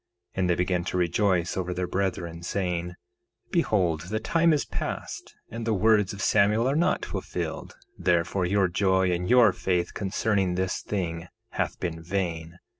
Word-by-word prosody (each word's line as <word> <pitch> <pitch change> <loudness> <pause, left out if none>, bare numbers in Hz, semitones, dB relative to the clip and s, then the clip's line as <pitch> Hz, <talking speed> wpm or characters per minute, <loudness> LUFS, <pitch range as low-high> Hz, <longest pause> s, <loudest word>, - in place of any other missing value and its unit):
1:6 - - -4
And 90 -1 +1
they 90 - +3
began 90 0 0
to 90 - -2
rejoice 90 0 +1
over 90 -1 -2
their 90 - -1
brethren, 90 -3 -2
saying: 90 -1 -2 0.6
Behold 90 - +1
the 110 +1 -1
time 165 +8 +2
is 150 -2 +1
past, - - -5 0.2
and 115 +1 -5
the 110 -1 +1
words 105 -1 +3
of 100 -1 -5
Samuel 110 +3 +3
are 135 - +1
not 175 +4 +1
fulfilled; - - -5 0.2
therefore, 90 +1 +1
your 100 0 +3
joy 95 0 +2
and 90 +1 -2
your 120 -5 +6
faith 90 0 -1
concerning 95 -2 0
this 95 0 -1
thing 85 -4 -3 0.2
hath - - -2
been 80 -2 -4
vain. 85 -2 -3
95 Hz, 165 wpm, -26 LUFS, 90-105 Hz, 0.6 s, your